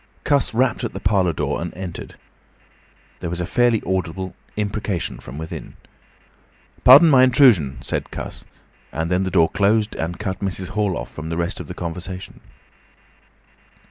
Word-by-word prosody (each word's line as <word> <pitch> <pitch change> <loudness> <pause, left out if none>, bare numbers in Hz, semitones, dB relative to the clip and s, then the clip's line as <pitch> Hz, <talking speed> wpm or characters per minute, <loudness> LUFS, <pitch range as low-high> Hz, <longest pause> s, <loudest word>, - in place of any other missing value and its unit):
Cuss 140 -2 +2
rapped 125 +2 +1
at 120 - -3
the 95 - -5
parlour 95 -2 +2
door 75 -2 -2
and 85 -1 -4
entered. 90 -2 -7 1.0
There 85 - -4
was 90 +1 -3
a 90 - -1
fairly 120 +2 +2
audible 95 0 -2 0.2
imprecation 105 -3 -2
from 65 +3 -10
within. 80 +1 -7 1.1
"Pardon 140 +7 +9
my 135 -5 +6
intrusion," 120 - +5
said - - -3
Cuss, - - -6 0.5
and 80 +2 -3
then 90 +1 +2
the - - -1
door 85 -3 +3
closed 105 +2 +2
and 85 +2 -3
cut 95 -3 -4
Mrs. 95 -2 -4
Hall 100 -4 0
off - - -6
from 80 +1 -6
the 80 - -3
rest 85 +4 -1
of - - -7
the 90 - -7
conversation. 90 +2 -6
95 Hz, 160 wpm, -21 LUFS, 85-105 Hz, 1.1 s, Pardon